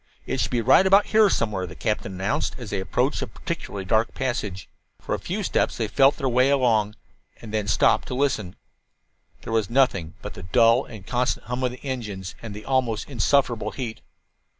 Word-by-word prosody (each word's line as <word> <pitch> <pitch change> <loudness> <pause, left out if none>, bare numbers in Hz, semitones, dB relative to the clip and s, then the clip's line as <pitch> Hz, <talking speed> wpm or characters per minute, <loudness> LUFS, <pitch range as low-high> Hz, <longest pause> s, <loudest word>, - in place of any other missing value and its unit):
"It - - -2
should - - +1
be 120 - 0
right 130 - +5
about 195 +2 +6
here 215 -1 +6
somewhere," 105 - -1
the - - -10
captain 105 -3 -2
announced, 100 +11 -1
as 120 -5 -8
they 100 - -1
approached 125 +9 0
a - - -3
particularly 155 - -6
dark 110 +3 +1
passage. 105 -8 -3 0.3
For - - -4
a - - -1
few - - -3
steps - - 0
they 110 - -1
felt 135 +5 +4
their 135 - -1
way 125 +2 +3
along, 115 -6 +2 0.4
and 110 -2 -10
then 105 -2 -1
stopped - - +3
to 125 - -4
listen. 125 -9 -1 0.9
There 115 - -5
was 110 -4 +1
nothing 110 -11 +1
but - - -6
the - - -10
dull 115 +7 +4
and 105 -5 -11
constant 125 +2 -1
hum 125 +1 -3
of 125 - +2
the 130 - -13
engines 105 -8 -5
and 110 -3 -7
the 105 - -9
almost 130 -3 0
insufferable 120 -2 +1
heat. 115 0 -5
115 Hz, 195 wpm, -24 LUFS, 105-130 Hz, 0.9 s, about